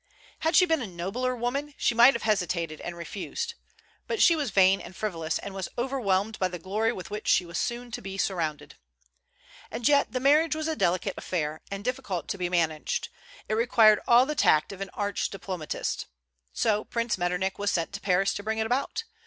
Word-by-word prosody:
Had 320 +2 +1
she 365 - +7
been 325 -4 +1
a 230 - -4
nobler 195 +9 -2
woman, 275 +5 -3
she - - +2
might 240 +4 +7
have 235 - -4
hesitated 175 -6 -1
and 175 0 -6
refused; 170 +3 -5 0.5
but 455 - -2
she 340 - +6
was 295 -4 -1
vain 190 0 +4
and 185 - -11
frivolous, 165 -7 -2
and 200 - -7
was 190 -1 -4
overwhelmed 220 -5 0
by 185 - +2
the 180 0 -6
glory 210 +6 0
with 185 -5 -8
which 210 +1 -5
she 180 - +4
was 170 0 -4
soon 240 0 -3
to - - -5
be 195 0 -6
surrounded. 170 -6 -2 1.0
And 235 +2 -1
yet 285 -1 +4
the 255 - -1
marriage 300 +4 +4
was 315 0 -2
a 320 - -1
delicate 185 - 0
affair, 155 -3 -3
and 200 0 -5
difficult 250 - -3
to 200 -3 -3
be 180 -1 -1
managed. 160 -3 0 0.4
It - - -1
required 220 -2 +5
all 240 +2 +6
the 300 - -2
tact 155 - +3
of 195 0 -9
an 195 - -4
arch 205 -1 -1
diplomatist. 185 -5 -4 0.4
So 210 -1 +1
Prince 230 -4 -2
Metternich 180 +2 -1
was 205 0 0
sent 170 0 -1
to 200 - -5
Paris 195 +1 +2
to - - -4
bring 220 +1 -2
it 220 - 0
about. 265 - -1
205 Hz, 200 wpm, -27 LUFS, 180-245 Hz, 1.0 s, she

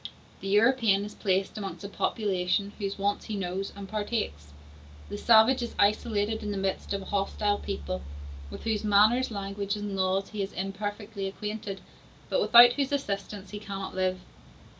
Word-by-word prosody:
The 195 - -6
European 210 -1 +4
is 210 - -8
placed 195 +1 -1
amongst 200 0 -6
a - - -4
population 200 -1 -1
whose 200 -1 -3
wants 200 +1 -1
he 215 - -4
knows 190 0 -3
and 200 -1 -8
partakes. 205 - -3 0.6
The - - -5
savage 235 +3 +6
is 240 - -4
isolated 210 +1 +1
in 210 - -4
the 205 - -2
midst 195 0 -2
of 200 -1 -2
a 190 - -9
hostile 205 +1 0
people, 185 -2 -4 0.5
with - - -9
whose 220 -2 -1
manners, 215 +5 +4
language, 200 -1 -3
and 205 -1 -4
laws 190 +1 0
he 210 -2 -3
is 195 - -4
imperfectly 205 +2 -4
acquainted, 210 0 -5 0.5
but - - +1
without 240 - +8
whose 275 +1 -1
assistance 200 -7 -3
he 205 - -5
cannot 195 -2 -6
live. 185 0 -1
205 Hz, 165 wpm, -28 LUFS, 195-215 Hz, 0.6 s, without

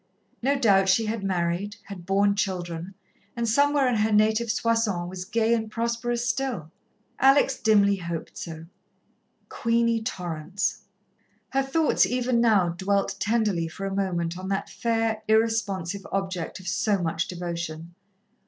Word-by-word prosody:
No 275 +3 +2
doubt 195 -6 +4
she 225 +4 +3
had 215 -1 -3
married, 185 +2 -1
had 185 -3 -10
borne 200 +1 +3
children, 180 -2 -3 0.4
and 235 -1 -1
somewhere 285 +3 +3
in 245 -3 +1
her 215 +1 +1
native 215 +2 +3
Soissons 225 -6 0
was 180 0 -6
gay 230 +1 +1
and 220 -2 -1
prosperous 235 +1 -2
still. 240 - -2 0.5
Alex 270 0 +4
dimly 200 -2 +4
hoped 170 -3 -6
so. 160 -1 -7 0.8
Queenie 230 0 +1
Torrance. 180 -2 -3 0.6
Her 270 - +1
thoughts 290 +4 +2
even 250 -1 +1
now 210 -7 +4
dwelt 195 +3 -1
tenderly 210 -6 +1
for 195 +4 -6
a 195 - -3
moment 175 -3 -1
on 190 - -6
that 195 0 -2
fair, 225 -1 0
irresponsive 205 -4 0
object 190 -4 -3
of 185 - -11
so 200 +2 +1
much 165 -1 -1
devotion. 170 -2 -5
200 Hz, 140 wpm, -26 LUFS, 180-230 Hz, 0.8 s, doubt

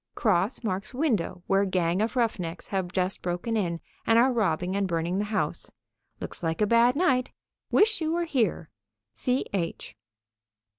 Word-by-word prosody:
Cross 210 +2 +1
marks 200 +3 -3
window 225 - 0
where 195 +1 +3
gang 185 -1 +1
of 225 +3 -1
rough 230 -5 +1
necks 170 0 -6
have 190 -3 -2
just 185 0 -1
broken 180 +6 -2
in 170 -6 -1 0.3
and 225 - +5
are 250 +2 +5
robbing 185 -4 0
and 200 -1 +1
burning 170 +2 -1
the 210 - 0
house. 210 0 -2 0.5
Looks - - -6
like 165 -1 -1
a 210 - +4
bad 235 +3 +4
night. 260 -6 +2 0.4
Wish 425 -2 +3
you 315 0 0
were 340 +1 0
here. 225 - 0 0.4
C.H." 195 - -2
200 Hz, 160 wpm, -27 LUFS, 180-245 Hz, 0.5 s, and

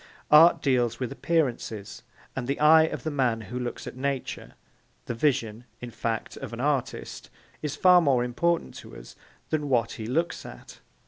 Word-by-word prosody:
Art 160 +3 +7
deals 120 -4 +1
with 125 -3 -3
appearances, 120 -10 -2 0.3
and 125 -2 -4
the 140 - -2
eye 160 +1 +7
of - - -5
the 155 - -2
man 125 -5 +1
who 115 +4 -6
looks 120 -1 -5
at - - -8
Nature, 135 0 -4 0.5
the - - -3
vision, 120 -3 -1
in 120 -1 -8
fact, 115 0 -4
of - - -7
the 115 - -8
artist, 140 -1 -2 0.3
is 150 -2 -3
far 180 -1 +6
more 135 -6 +2
important 170 +8 -1
to - - -11
us - - -13 0.4
than 150 -2 -1
what 115 -3 +1
he 110 -2 -6
looks 165 +8 -1
at. - - -12
130 Hz, 175 wpm, -26 LUFS, 120-150 Hz, 0.5 s, Art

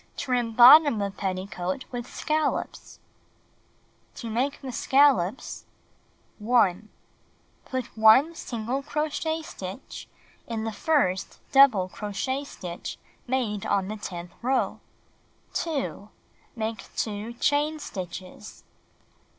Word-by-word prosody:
Trim 245 -3 -1
bottom 255 +1 +8
of 200 0 -4
petticoat 190 +2 -3
with 245 -1 -6
scallops 310 0 -2 1.2
1. - - -34
To 230 - -6
Make 260 +5 -1
the 265 -2 -6
Scallops 265 - +2 0.7
Put 215 -3 +2 1.1
1 220 +9 +6
single 245 -3 -4
crochet 310 +2 -2
stitch 190 -4 -8 0.4
in 225 -2 -3
the 225 - -2
first 210 - 0
double 260 -9 +6
crochet 210 +8 -3
stitch 180 -9 -7 0.3
made 240 -6 -1
on 195 -1 0
the 215 - -4
tenth 175 -4 -7
row. 255 +2 0 0.7
2. 280 -10 -3 0.5
Make 225 -1 -3
2 215 +1 -3
chain 290 +5 +1
stitches. 185 - -8
230 Hz, 100 wpm, -26 LUFS, 200-275 Hz, 1.2 s, bottom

